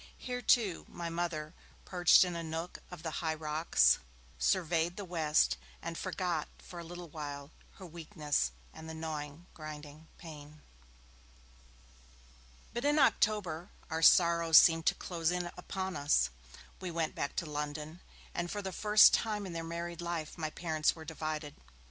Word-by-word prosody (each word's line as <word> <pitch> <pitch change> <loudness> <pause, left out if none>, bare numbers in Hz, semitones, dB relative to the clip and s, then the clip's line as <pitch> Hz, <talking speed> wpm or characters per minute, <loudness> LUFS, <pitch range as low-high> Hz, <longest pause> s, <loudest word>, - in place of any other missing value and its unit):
Here, 250 -1 -4
too, 215 -9 +2
my 170 -1 -5
Mother, 165 -2 -3 0.3
perched 180 0 +6
in 175 -1 -4
a 170 - -3
nook 165 +2 -5
of 180 -3 -10
the 160 - -3
high 160 -1 0
rocks, 155 +1 +3 0.4
surveyed 170 - +1
the 205 - -5
west, 160 -4 +2 0.2
and 165 0 -5
forgot 180 -3 -2
for 175 - -10
a - - -6
little 175 +1 -8
while 145 -2 -7 0.2
her 190 - -11
weakness 160 - -2 0.2
and 160 0 -10
the 160 - -6
gnawing, 155 0 -5
grinding 155 0 -9
pain. 150 -2 -11 2.1
But 240 +2 -3
in 295 +1 +3
October, 205 - +2 0.2
our 160 0 -1
sorrows 170 -1 +6
seemed 165 -1 +6
to - - +4
close 165 -2 -2
in 180 -1 -2
upon 190 -1 -4
us. 105 - +2 0.5
We 185 - -4
went 165 -2 -1
back 140 - -3
to 175 - -1
London, 150 +2 -5 0.3
and 175 0 -2
for 205 +2 -4
the 190 - -3
first 210 +3 +6
time 210 -3 0
in 180 - -6
their 165 0 -4
married 170 +1 -5
life, 170 -3 -4
my 155 -2 -3
parents 155 -1 0
were 160 -1 -10
divided. 155 -1 -4
165 Hz, 155 wpm, -32 LUFS, 155-175 Hz, 2.1 s, perched